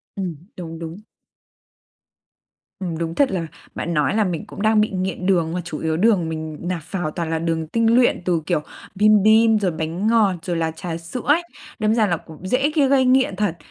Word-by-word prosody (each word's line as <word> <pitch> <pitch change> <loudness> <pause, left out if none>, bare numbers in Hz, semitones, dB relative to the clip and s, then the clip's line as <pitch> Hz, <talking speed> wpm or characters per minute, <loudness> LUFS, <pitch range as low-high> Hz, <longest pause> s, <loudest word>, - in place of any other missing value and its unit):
Ừm, 185 -5 -3 0.2
đúng, 165 -2 -7
đúng. 165 +3 -7 1.8
Ừm, 170 -4 -3
đúng 165 0 -3
thật 280 -7 +3
là 170 -4 -2 0.3
bạn 170 - -3
nói 150 +5 +1
là 220 - +3
mình 180 +1 -3
cũng 200 - -9
đang 215 0 +4
bị 215 - +1
nghiện 185 -1 -3
đường, 170 -4 +2
mà 180 - -2
chủ 160 -3 -6
yếu 160 0 -1
đường 190 -5 +3
mình 155 -1 -5
nạp 175 -1 -3
vào 175 -6 -2
toàn 170 -1 -3
là 160 0 -1
đường 165 -1 -1
tinh 230 +4 +2
luyện 245 -7 +3
từ, 170 -3 +1
kiểu, 150 - 0 0.3
bim 210 0 +5
bim, 220 0 +5
rồi 185 -4 0
bánh 160 +6 -3
ngọt, 220 -4 +4
rồi 175 -1 -3
là 160 -1 0
trà 165 +1 -5
sữa 170 +9 -6
ấy, 305 +4 +4 0.4
đâm 215 0 +2
ra 220 -3 +3
là 170 -3 0
cũng 160 +4 -11
dễ, 270 +7 +2
kia 285 -3 +4
gây 265 -1 +4
nghiện 255 -6 +3
thật. 190 -4 -1
185 Hz, 215 wpm, -21 LUFS, 165-215 Hz, 1.8 s, bim